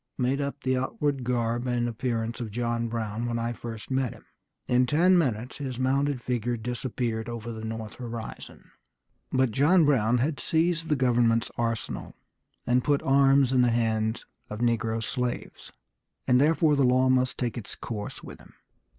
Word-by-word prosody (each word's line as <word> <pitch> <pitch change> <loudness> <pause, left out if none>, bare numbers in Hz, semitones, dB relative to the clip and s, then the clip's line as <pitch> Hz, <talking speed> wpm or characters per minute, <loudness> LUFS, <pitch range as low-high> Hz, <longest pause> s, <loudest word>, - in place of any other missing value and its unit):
made 130 +2 0
up 140 0 -4
the 130 0 +1
outward 135 +1 -1
garb 120 0 -1
and 120 -1 0
appearance 115 0 -2
of 115 - -4
John 115 +1 -1
Brown 115 0 -3
when 120 0 -1
I 115 +1 -2
first 115 0 -8
met 130 -2 0
him. 110 - -17 0.4
In 125 0 +3
ten 175 +7 +4
minutes 125 -7 0
his 130 -4 -4
mounted 135 0 0
figure 120 -1 -1
disappeared 115 -1 -3
over 120 0 -5
the 110 -1 -7
north 110 -1 -6
horizon." 115 -2 -8 0.6
But 130 -2 +2
John 155 - +4
Brown 125 -5 +3
had 140 +4 0
seized 165 0 0
the 150 - +3
government's 120 -3 +2
arsenal, 115 -1 -3 0.5
and 125 0 +2
put 145 -1 +1
arms 135 -1 +4
in 130 - +4
the 125 - +4
hands 110 -1 0 0.2
of 105 - -5
negro 115 -1 0
slaves, 125 +1 -4 0.5
and 125 +1 +4
therefore 155 0 +4
the 140 - +3
law 130 +1 +4
must 130 -1 +2
take 120 -4 -2
its 115 - -6
course 105 -3 -6
with - - -10
him. - - -18
125 Hz, 170 wpm, -27 LUFS, 115-135 Hz, 0.6 s, ten